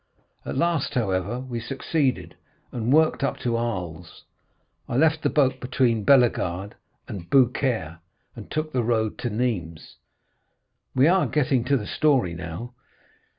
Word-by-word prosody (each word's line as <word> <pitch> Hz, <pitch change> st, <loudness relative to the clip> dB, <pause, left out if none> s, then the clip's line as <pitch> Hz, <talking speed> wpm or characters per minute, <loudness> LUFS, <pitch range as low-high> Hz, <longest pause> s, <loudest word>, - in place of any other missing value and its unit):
At -, -, -3 dB
last, 170 Hz, -2 st, 0 dB
however, 105 Hz, +1 st, -1 dB
we 125 Hz, -3 st, -5 dB
succeeded, 135 Hz, +2 st, -1 dB, 0.4 s
and 120 Hz, 0 st, -2 dB
worked 155 Hz, -1 st, +3 dB
up 140 Hz, -, 0 dB
to 120 Hz, -1 st, 0 dB
Arles. 90 Hz, -8 st, -4 dB, 0.7 s
I 120 Hz, -, -1 dB
left 160 Hz, +2 st, +3 dB
the -, -, +1 dB
boat 130 Hz, -3 st, +2 dB
between 125 Hz, -3 st, +1 dB
Bellegarde 105 Hz, -8 st, +2 dB, 0.3 s
and 85 Hz, -4 st, -8 dB
Beaucaire, 120 Hz, -, +1 dB, 0.4 s
and -, -, -10 dB
took 155 Hz, 0 st, -3 dB
the 125 Hz, -, +1 dB
road 110 Hz, -2 st, 0 dB
to 120 Hz, -, -2 dB
Nîmes." 105 Hz, -9 st, -3 dB, 1.0 s
"We 130 Hz, +3 st, +5 dB
are 185 Hz, +2 st, +3 dB
getting 135 Hz, -4 st, +1 dB
to 140 Hz, +2 st, +2 dB
the 105 Hz, -, -5 dB
story 130 Hz, -, +1 dB
now?" 85 Hz, +8 st, -7 dB
120 Hz, 140 wpm, -24 LUFS, 105-140 Hz, 1.0 s, We